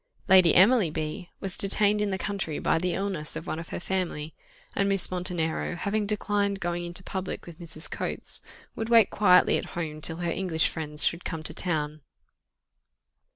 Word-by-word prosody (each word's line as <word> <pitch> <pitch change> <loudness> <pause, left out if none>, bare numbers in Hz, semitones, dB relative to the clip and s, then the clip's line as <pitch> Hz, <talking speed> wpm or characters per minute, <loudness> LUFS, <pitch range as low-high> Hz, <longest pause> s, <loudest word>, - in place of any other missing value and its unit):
Lady 185 -3 +6
Emily 205 -1 +6
B 155 +2 -4
was 190 -2 0
detained 205 +1 +3
in 210 - +1
the 190 - -1
country 195 -6 -3
by 165 - +1
the 180 +1 -1
illness 190 -6 -3
of 160 - -5
one 160 - -3
of 165 - -8
her - - -4
family, 175 -4 -3 0.4
and 200 0 +2
Miss 195 -2 0
Montenero, 175 -2 -1
having 205 +3 -1
declined 205 -1 0
going 175 -1 -2
into 175 +2 -6
public 190 0 -5
with 170 -1 -11
Mrs. 160 -1 -5
Coates, - - -4 0.3
would 225 0 -3
wait 230 -3 +6
quietly 180 -3 +5
at - - -6
home 155 -3 -4
till 165 +1 -2
her 170 -1 -2
English 170 -4 +1
friends 150 -2 +1
should 170 +1 0
come 160 -2 -4
to - - -5
town. 155 -3 -2
180 Hz, 180 wpm, -27 LUFS, 160-195 Hz, 0.4 s, Lady